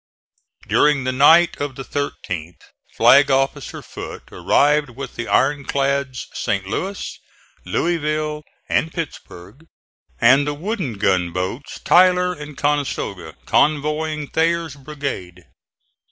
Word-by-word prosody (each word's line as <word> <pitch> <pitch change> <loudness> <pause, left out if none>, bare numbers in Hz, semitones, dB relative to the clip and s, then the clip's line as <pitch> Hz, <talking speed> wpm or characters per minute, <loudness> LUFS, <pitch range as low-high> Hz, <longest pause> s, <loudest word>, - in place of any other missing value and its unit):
During 145 -2 +3
the 130 - 0
night 160 +6 +5
of 145 -2 -3
the 135 - -6
13th 90 - -5 0.4
Flag 140 +1 +6
officer 135 0 -1
Foote - - -9
arrived 145 0 +2
with 130 +1 -8
the 120 - -5
iron 145 +1 +2
clads 140 -2 -1
St. 100 -1 -2
Louis, 190 - -4 0.5
Louisville 155 -2 -1 0.3
and 160 - 0
Pittsburg 155 - -8 0.5
and 135 +5 +5
the 145 - -2
wooden 180 - -3
gunboats 95 - -1
Tyler 180 0 +4
and 150 -3 -10
Conestoga, 145 -1 -2
convoying 150 +1 +1
Thayer's 165 -1 0
brigade. 135 - -6
145 Hz, 110 wpm, -20 LUFS, 130-155 Hz, 0.5 s, Flag